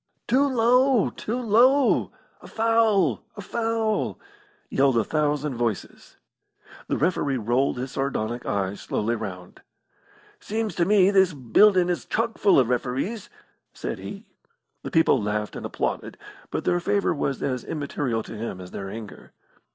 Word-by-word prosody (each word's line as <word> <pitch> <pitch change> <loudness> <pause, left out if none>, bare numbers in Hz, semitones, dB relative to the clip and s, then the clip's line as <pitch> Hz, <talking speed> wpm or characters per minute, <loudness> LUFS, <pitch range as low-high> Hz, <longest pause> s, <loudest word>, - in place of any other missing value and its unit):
"Too 275 +3 +3
low! 250 -1 +3
Too 235 +4 -4
low! 250 +4 +3 0.3
A - - -12
foul! 220 - +2
A - - -5
foul!" 225 +1 -1 0.5
yelled 135 -2 +2
a 115 - +3
thousand 150 +2 0
voices. 115 -4 -4 0.7
The - - -1
referee 145 -4 0
rolled 120 +4 0
his 125 +1 -4
sardonic 120 -3 -2
eyes 100 0 -2
slowly 115 +3 -1
round. 90 -5 -8 0.8
"Seems 220 -1 -3
to 170 - +3
me 200 0 +4
this 190 -3 +4
buildin' 175 - +4
is 175 -1 -2
chock 225 +1 -1
full 200 - +5
of 125 -3 +3
referees," 130 - -2 0.4
said - - -5
he. - - -8 0.6
The - - -6
people 160 -7 +3
laughed 105 0 -2
and - - -5
applauded, - - -3 0.3
but - - -3
their 175 - +2
favour 200 +2 +1
was 140 -3 -2
as 130 -3 -2
immaterial 140 -6 -3
to - - -9
him 105 -4 -5
as 90 -1 -10
their 95 -1 -6
anger. 105 0 -10
150 Hz, 145 wpm, -25 LUFS, -, 0.8 s, full